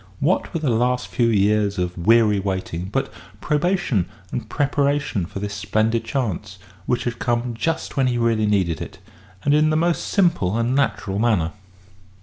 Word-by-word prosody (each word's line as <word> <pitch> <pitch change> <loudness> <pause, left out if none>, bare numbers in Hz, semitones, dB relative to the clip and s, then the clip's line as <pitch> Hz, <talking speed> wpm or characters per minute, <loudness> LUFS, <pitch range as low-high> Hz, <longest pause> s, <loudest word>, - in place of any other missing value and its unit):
What 160 +7 +1
were 165 - -2
the 150 -5 0
last 125 +2 +1
few 120 - +1
years 105 -1 +2
of 90 0 -2
weary 105 +2 +4
waiting 95 -3 -3
but - - -2 0.3
probation 150 - 0 0.2
and - - -4
preparation 140 -8 0
for - - -8
this 100 +1 -4
splendid 110 +3 0
chance, 105 - -3 0.3
which 125 - 0
had 120 -1 -3
come 120 0 -1
just 160 +6 -3
when 135 -1 +3
he 120 -1 0
really 115 -2 +2
needed 95 -5 +1
it, - - -7 0.5
and 145 - +3
in 155 +1 +4
the 155 - +2
most 170 +1 0
simple 170 - +2
and 115 +2 0
natural 105 -7 0
manner? 105 -8 +2
115 Hz, 165 wpm, -22 LUFS, 100-140 Hz, 0.5 s, weary